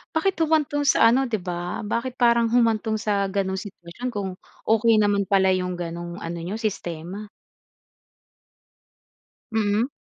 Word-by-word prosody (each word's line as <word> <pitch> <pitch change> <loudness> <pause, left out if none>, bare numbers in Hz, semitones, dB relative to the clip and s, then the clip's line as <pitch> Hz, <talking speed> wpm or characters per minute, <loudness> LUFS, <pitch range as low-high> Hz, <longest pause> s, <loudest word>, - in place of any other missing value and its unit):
bakit 380 +4 +1
humantong 300 -2 +2
sa 230 - +6
ano 265 +2 +2
'di 220 - 0
ba? 180 +1 -4
Bakit 240 +4 -3
parang 235 -1 +4
humantong 225 -2 +2
sa 200 -2 0
gano’ng 190 -1 -1
sitwasyon 195 +4 -7
kung 200 -4 -3 0.4
okey 225 0 +4
naman 205 -1 +2
pala 190 -2 +4
'yong 180 -1 -2
gano'ng 170 0 -5
ano 170 -3 -5
n'yo, 180 +5 -4
sistema? 195 -2 -5 2.2
Mm. 220 +2 +1
210 Hz, 130 wpm, -24 LUFS, 185-235 Hz, 2.2 s, sa